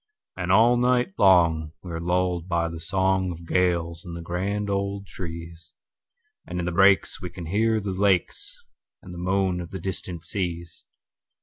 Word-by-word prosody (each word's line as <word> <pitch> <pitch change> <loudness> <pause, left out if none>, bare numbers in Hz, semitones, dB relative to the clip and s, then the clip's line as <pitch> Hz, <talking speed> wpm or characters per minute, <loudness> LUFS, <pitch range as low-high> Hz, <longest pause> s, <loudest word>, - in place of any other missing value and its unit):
And 90 -1 -2
all 115 +5 +5
night 125 -3 +2
long 85 -5 +4
we 90 - -7
are 80 - -3
lulled 90 0 0
by 85 -1 0
the 85 0 -7
songOf 95 -1 0
gales 85 -1 0
in 85 -2 -8
the 85 - -6
grand 100 +4 -2
old 100 0 -2
trees; 85 -2 -8 0.7
And 90 +1 -4
in 85 - -2
the 90 - -1
breaks 95 +2 +4
we 90 - -5
can 85 0 -8
hear 110 +6 +1
the 100 -2 -4
lakesAnd 100 - 0 0.5
the 90 - -8
moan 95 0 0
of 85 - -8
the 95 - -6
distant 90 -3 -5
seas. 85 -4 -5
90 Hz, 165 wpm, -25 LUFS, 85-100 Hz, 0.7 s, all